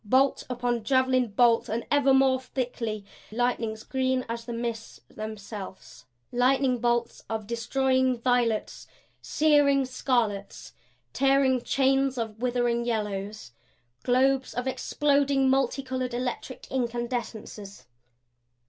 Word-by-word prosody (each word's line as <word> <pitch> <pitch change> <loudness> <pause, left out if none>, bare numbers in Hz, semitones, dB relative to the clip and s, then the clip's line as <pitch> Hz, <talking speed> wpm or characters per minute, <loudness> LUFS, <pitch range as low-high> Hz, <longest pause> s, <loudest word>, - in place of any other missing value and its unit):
Bolt 260 +6 +2
upon 245 -2 -1
javelin 260 +1 +2
bolt, 230 +2 +3
and 230 +2 -2
ever 285 -2 +4
more 265 -1 +4
thickly; 240 -5 -4 0.3
lightnings 225 -2 -1
green 260 -1 -1
as 230 0 -5
the 240 - -6
mists 230 -1 -5
themselves; 210 - -8 0.3
lightning 255 0 +2
bolts 240 0 0
of 220 -1 -3
destroying 260 +3 +1
violets, 235 -3 0 0.3
searing 290 -3 +3
scarlets; 235 -6 -2 0.4
tearing 270 -2 +3
chains 270 0 +1
of 220 -2 -4
withering 240 -1 +1
yellows, 210 - -3 0.5
globes 260 +1 +2
of 245 +1 -2
exploding 280 0 +1
multicolored 260 -1 0
electric 250 +1 -4
incandescences. 235 -5 -4
245 Hz, 105 wpm, -27 LUFS, 230-265 Hz, 0.5 s, ever